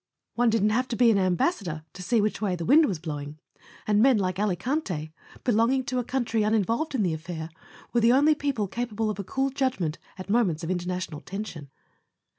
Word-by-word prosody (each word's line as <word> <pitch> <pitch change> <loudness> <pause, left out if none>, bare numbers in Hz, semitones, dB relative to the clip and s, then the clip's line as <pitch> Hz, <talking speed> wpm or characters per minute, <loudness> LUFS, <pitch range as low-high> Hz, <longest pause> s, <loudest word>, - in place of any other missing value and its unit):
One 240 0 +3
didn't 215 -1 +2
have 250 +4 +1
to 235 - -3
be 235 -1 +5
an 200 - +3
Ambassador 180 - 0
to 185 - -9
see 220 +4 +2
which 210 0 -1
way 195 -4 0
the 170 -1 -5
wind 305 +5 +6
was 190 - -2
blowing; 150 -2 -6 0.5
and 210 0 +3
men 260 -1 +5
like 185 -2 -1
Alicante, 190 - -2 0.3
belonging 245 +3 +2
to 255 0 -2
a - - -1
country 240 -3 -1
uninvolved 225 - 0
in 225 - +1
the 175 -4 +1
affair, 160 0 -6 0.4
were 240 - +3
the 230 +1 +5
only 290 +4 +5
people 280 -8 -1
capable 225 0 -2
of 210 - -7
a - - -2
cool 270 +7 -1
judgment 255 - -1 0.2
at 185 - -8
moments 200 -7 +1
of 165 - -2
international 180 -3 -3
tension. 195 -8 -7
210 Hz, 200 wpm, -26 LUFS, 180-245 Hz, 0.5 s, wind